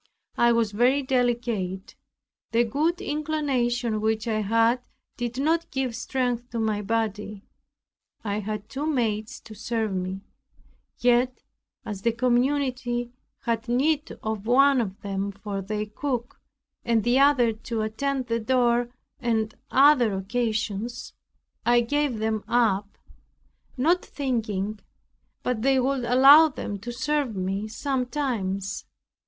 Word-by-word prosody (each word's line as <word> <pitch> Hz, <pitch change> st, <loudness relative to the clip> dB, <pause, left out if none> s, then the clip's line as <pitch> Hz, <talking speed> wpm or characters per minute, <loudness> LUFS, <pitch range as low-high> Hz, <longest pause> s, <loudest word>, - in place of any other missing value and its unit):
I 235 Hz, 0 st, +4 dB
was 230 Hz, -2 st, +2 dB
very 250 Hz, +6 st, +3 dB
delicate, 235 Hz, -7 st, -1 dB, 0.6 s
the 235 Hz, +1 st, +4 dB
good 305 Hz, +9 st, 0 dB
inclination 260 Hz, -7 st, -1 dB
which 220 Hz, +1 st, 0 dB
I 215 Hz, -1 st, 0 dB
had 230 Hz, +4 st, +2 dB, 0.3 s
did 240 Hz, +1 st, -4 dB
not 325 Hz, +4 st, +1 dB
give 260 Hz, -3 st, -2 dB
strength 245 Hz, -1 st, -2 dB
to 235 Hz, -, -4 dB
my 215 Hz, -2 st, 0 dB
body. 210 Hz, -1 st, -2 dB, 0.8 s
I 205 Hz, -1 st, -1 dB
had 215 Hz, 0 st, -5 dB
two 285 Hz, +3 st, -4 dB
maids 225 Hz, -7 st, -1 dB
to 220 Hz, -, -12 dB
serve 220 Hz, -1 st, -2 dB
me; 185 Hz, +1 st, -3 dB, 0.8 s
yet, 245 Hz, +1 st, +2 dB, 0.4 s
as 205 Hz, -2 st, -5 dB
the 235 Hz, -, +2 dB
community 245 Hz, 0 st, 0 dB, 0.3 s
had 230 Hz, 0 st, -2 dB
need 295 Hz, +5 st, +1 dB
of 220 Hz, -1 st, -3 dB
one 270 Hz, +1 st, +5 dB
of 195 Hz, -3 st, -5 dB
them 200 Hz, 0 st, -3 dB
for 200 Hz, 0 st, -5 dB
their 210 Hz, +2 st, -3 dB
cook, 245 Hz, +3 st, -4 dB, 0.4 s
and 230 Hz, -2 st, +2 dB
the 245 Hz, +4 st, +3 dB
other 275 Hz, -5 st, +4 dB
to 220 Hz, 0 st, -4 dB
attend 260 Hz, +5 st, -2 dB
the 230 Hz, -1 st, -1 dB
door 240 Hz, 0 st, +2 dB, 0.3 s
and 220 Hz, -3 st, 0 dB, 0.2 s
other 260 Hz, -6 st, +5 dB
occasions, 220 Hz, +2 st, -2 dB, 0.5 s
I 240 Hz, +1 st, +4 dB
gave 285 Hz, 0 st, 0 dB
them 220 Hz, -1 st, -1 dB
up, 205 Hz, -4 st, +1 dB, 0.8 s
not 335 Hz, +8 st, +2 dB
thinking 215 Hz, -7 st, -2 dB, 0.6 s
but 250 Hz, -3 st, -1 dB
they 265 Hz, +2 st, +3 dB
would 260 Hz, -1 st, 0 dB
allow 275 Hz, +6 st, +8 dB
them 205 Hz, -7 st, -5 dB
to 240 Hz, +5 st, -6 dB
serve 285 Hz, -1 st, -1 dB
me 195 Hz, +3 st, -2 dB
sometimes. 240 Hz, -6 st, -2 dB
235 Hz, 125 wpm, -25 LUFS, 215-260 Hz, 0.8 s, allow